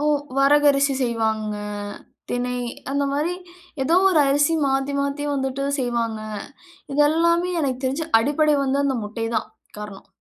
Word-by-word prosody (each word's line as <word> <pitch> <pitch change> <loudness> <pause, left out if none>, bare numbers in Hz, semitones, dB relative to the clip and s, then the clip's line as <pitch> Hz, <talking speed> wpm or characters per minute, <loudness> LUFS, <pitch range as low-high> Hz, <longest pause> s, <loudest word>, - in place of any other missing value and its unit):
ஓ! - - -2 0.3
வரகு 290 +2 +4
அரிசி 275 0 +2
செய்வாங்க, 220 -3 -1 0.8
தினை 250 0 -1 0.3
அந்த 280 +1 0
மாரி 310 +5 0 0.5
ஏதோ 325 +6 +3
ஒரு 325 -5 +4
அரிசி 290 +3 +3
மாத்தி 270 +1 0
மாத்தி 280 +1 -2
வந்துட்டு 270 0 -2 0.2
செய்வாங்க. 235 -3 -1 0.7
இது 295 - +3
எல்லாமே 335 +3 +2
எனக்கு 260 -2 -2
தெரிஞ்சு 280 +5 -2
அடிப்படை 295 +4 +2
வந்து 275 +1 0
அந்த 275 -2 +1
முட்டை 225 +2 -4
தான் 220 - -2 0.3
காரணம். 210 -2 -9
275 Hz, 140 wpm, -22 LUFS, 245-290 Hz, 0.8 s, வரகு